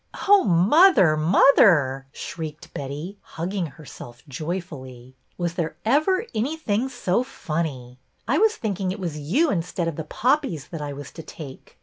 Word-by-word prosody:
" - - -7
Oh, 405 0 +7
mother, 195 - +5
mother! 155 - +4
" - - -39
shrieked 155 -1 -7
Betty, 150 +8 -6
hug 170 +3 -6
ging 190 -4 -2
herself 130 -5 -12
joyfully. 135 -5 -6
'' - - -42
Was 175 -1 -2
there 170 -2 -3
ever 310 - +2
anything 245 -1 -1
so 240 -5 0
funny? 150 - -4 0.3
I 275 +7 +2
was 440 0 +3
thinking 195 - -2
it 200 - -6
was 165 -5 -4
you 250 - +1
instead 170 -1 -2
of 165 - -4
the 160 - -3
poppies 185 - -1
that 165 -3 -6
I 145 -1 -4
was 140 0 -8
to 165 - -9
take. 150 -4 -11
170 Hz, 165 wpm, -24 LUFS, 150-220 Hz, 0.3 s, Oh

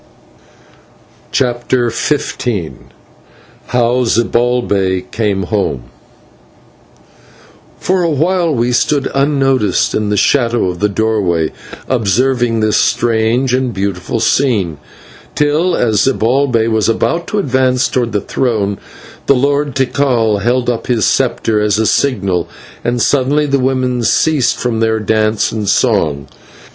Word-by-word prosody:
CHAPTER 120 -1 0
XV 150 +5 -2 1.3
HOW 125 +1 +1
ZIBALBAY 115 -5 +1
CAME 105 -4 -1
HOME 90 - -2 2.0
For 185 0 0
a 170 - +1
while 170 +3 +1
we 120 -3 0
stood 140 +3 0
unnoticed 135 -7 +1
in 105 -1 -1
the 105 - 0
shadow 120 -5 +2
of 90 -1 -6
the 105 - +1
doorway, 100 -7 0 0.4
observing 120 0 +1
this 110 -1 +2
strange 120 +2 +1
and 130 -3 -1
beautiful 100 +3 -3
scene, 105 - 0 0.6
till, 155 +4 +1
as 110 -4 +1
Zibalbay 125 -2 +1
was 110 -1 +1
about 170 +9 -1
to 210 - -3
advance 130 -7 +1
towards 120 -3 -2
the 105 - 0
throne, 100 -3 -1 0.5
the 140 - +5
Lord 140 +1 0
Tikal 125 -5 +1
held 120 +3 0
up 120 -2 -2
his 115 -5 +1
sceptre 110 -2 +1
as 105 -1 +1
a 110 - +1
signal, 95 -10 0 0.3
and 120 +1 -1
suddenly 140 +4 +1
the 140 -1 0
women 130 -1 0
ceased 145 +3 +1
from 120 -2 -1
their 110 0 +1
dance 110 0 0
and 105 -3 -3
song. 85 - +1
120 Hz, 120 wpm, -14 LUFS, 105-130 Hz, 2.0 s, the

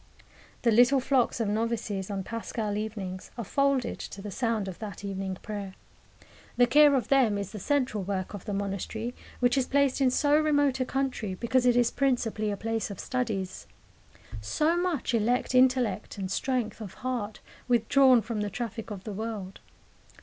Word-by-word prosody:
The 235 - +4
little 245 +5 +5
flocks 260 -2 +1
of 225 - 0
novices, 215 -2 -2
on 195 -2 -3
paschal 220 -1 -3
evenings, 200 -4 -5
are 235 - -3
folded 275 +3 +1
to - - -7
the 205 +1 -6
sound 225 -3 -1
of 185 - -7
that 205 -2 -7
evening 190 -1 -3
prayer. 200 -3 -6 0.8
The 245 - +6
care 290 +3 +6
of 255 - -1
them 255 -7 +4
is 200 -1 -4
the 215 - -7
central 255 -4 0
work 190 0 -3
of 205 - -8
the 210 - -3
monastery, 200 +4 -3 0.3
which 245 +2 +3
is 255 - -1
placed 280 -1 +2
in 260 - +5
so 290 +3 +3
remote 290 -3 +3
a 255 - +1
country 250 -8 -2
because 250 +4 +1
it 245 - +5
is 240 -1 +3
principally 240 -5 0
a 200 - -2
place 225 0 -2
of 200 - -7
studies. 215 -7 -3 0.7
So 305 - +1
much 345 -8 -1
elect 235 +3 +1
intellect 255 -6 +2
and 190 -1 -4
strength 240 -2 -1
of 205 -4 -8
heart 235 -5 -2 0.3
withdrawn 245 +1 +5
from 220 0 -3
the 210 - -1
traffic 225 +1 -5
of 200 -3 -7
the 210 - -5
world! 210 -2 -5
230 Hz, 175 wpm, -28 LUFS, 205-255 Hz, 0.8 s, The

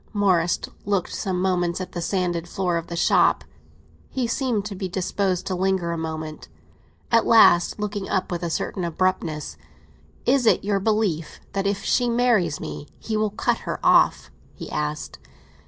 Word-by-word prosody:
Morris 185 -5 +2 0.2
looked 200 -3 -1
some 190 -3 -2
moments 180 -1 0
at 185 -1 -6
the 175 - -4
sanded 175 -2 -1
floor 180 -2 -1
of 165 - -5
the 170 - -5
shop; 170 - +3 0.7
he 260 -2 -1
seemed 230 -3 -1
to 210 - -5
be 190 -1 -4
disposed 185 0 -1
to 190 - -2
linger 185 -2 0
a - - -2
moment. 155 -1 -6 0.6
At 230 -1 +4
last, 210 -5 +5
looking 205 -1 -3
up 185 -2 -1
with 175 -1 -2
a 170 - -2
certain 180 +3 -2
abruptness, 170 -3 -1 0.7
"It 250 - +4
is 250 -5 +4
your 200 0 +1
belief 200 -6 -1
that 195 0 0
if 200 0 -1
she 245 -1 +2
marries 230 -10 +2
me 155 -2 -7
he 220 - -4
will 215 0 +1
cut 205 - 0
her - - -5
off?" - - +4 0.2
he - - -8
asked. 150 0 -3
185 Hz, 170 wpm, -23 LUFS, 170-210 Hz, 0.7 s, last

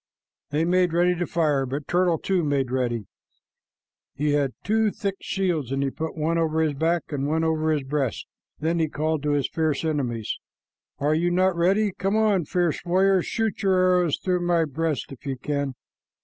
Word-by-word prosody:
They 150 +3 +1
made 180 -1 +2
ready 175 +1 +3
to 175 0 -2
fire, 150 -5 +1
but 140 +3 -4
Turtle, 175 -2 +2
too, 185 +1 0
made 140 -4 0
ready. 120 -4 -1 1.1
He 150 +1 0
had 140 -3 +1
two 220 +1 +2
thick 200 -1 -3
shields, 175 -9 -1
and 135 0 0
he 135 - -1
put 160 +3 -5
one 165 +2 +1
over 160 -1 +1
his 155 -2 +1
back 165 +4 +1
and 140 -1 -1
one 160 +2 +1
over 160 -1 +1
his 150 -3 0
breast. 135 -3 -2 0.3
Then 165 +2 0
he 160 - +2
called 155 0 -1
to 150 0 0
his 145 -2 +1
fierce 160 -2 -1
enemies, 125 -8 -2 0.6
"Are 145 +2 +1
you 170 +3 +2
not 185 +1 +2
ready? 195 +5 +2
Come 195 +2 -1
on, 210 -6 +2
fierce 175 -1 0
warriors! 185 +1 +2
Shoot 225 -2 -1
your 195 -2 +3
arrows 180 -3 +3
through 180 -1 -1
my 175 -2 +2
breast 155 -1 -2
if 135 - -11
you 135 -1 -2
can." 140 0 -2
160 Hz, 190 wpm, -25 LUFS, 145-180 Hz, 1.1 s, ready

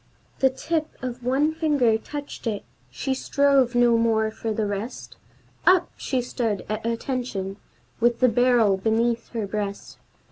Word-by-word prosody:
The 265 - +5
tip 310 +4 -2 0.2
of 250 -1 -5
one 275 +5 +2
finger 295 -8 +2
touched 285 +2 -6
it, 210 -3 -2 0.3
she 265 - -2
strove 270 -2 +2
no 240 -1 +4
more 220 -1 +2
for 220 0 -4
the 215 0 -1
rest; 205 +4 -5 0.5
Up, 365 -1 +5
she 255 -2 -2
stood 230 -5 -2
up - - -8
at 215 +1 -3
attention, 230 -5 -3 0.4
with 235 0 +2
the 255 - +5
barrel 235 -4 +4
beneath 230 +3 0
her 225 -3 -2
breast. 200 0 -5
235 Hz, 150 wpm, -24 LUFS, 220-265 Hz, 0.5 s, The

